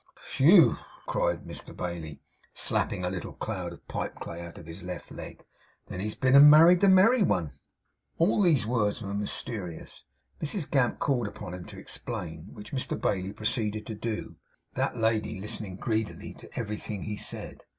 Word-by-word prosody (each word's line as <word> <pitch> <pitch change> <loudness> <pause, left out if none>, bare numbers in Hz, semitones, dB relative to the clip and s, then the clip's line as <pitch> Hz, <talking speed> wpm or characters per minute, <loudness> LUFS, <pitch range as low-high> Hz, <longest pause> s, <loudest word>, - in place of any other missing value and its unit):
'Whew!' 165 +5 +7 0.3
cried - - 0
Mr - - -8
Bailey, 80 -4 -5 0.3
slapping 90 - 0
a - - 0
little 95 -2 -5
cloud - - -4
of - - -14
pipe - - -4
clay 85 0 -7
out 85 -1 -9
of 85 - -11
his 85 +3 -7
left 90 +1 -7
leg, - - -9 0.4
'then 90 - -5
he's 105 +2 -3
been 130 0 +3
and 145 +1 +11
married 165 +4 +8
the 200 - +5
merry 215 +6 +6
one!' 85 - +1 0.7
As 165 - +5 0.2
these 160 - +4
words 110 -1 0
were 100 0 -4
mysterious, 100 -3 -4 0.4
Mrs 155 +1 -2
Gamp 130 -4 +2
called 125 -6 0
upon 100 -3 -7
him 90 -1 -7
to - - -11
explain, 80 +1 -6
which 105 - -11
Mr 130 - -2
Bailey 95 -1 -1
proceeded 110 -1 -1
to 110 - -5
do; 110 +1 -4 0.4
that - - -1
lady 110 -2 0
listening 100 -1 -3
greedily 110 +2 -2
to - - -13
everything 105 -2 -4
he 105 - -3
said. - - -4
105 Hz, 170 wpm, -28 LUFS, 95-130 Hz, 0.7 s, and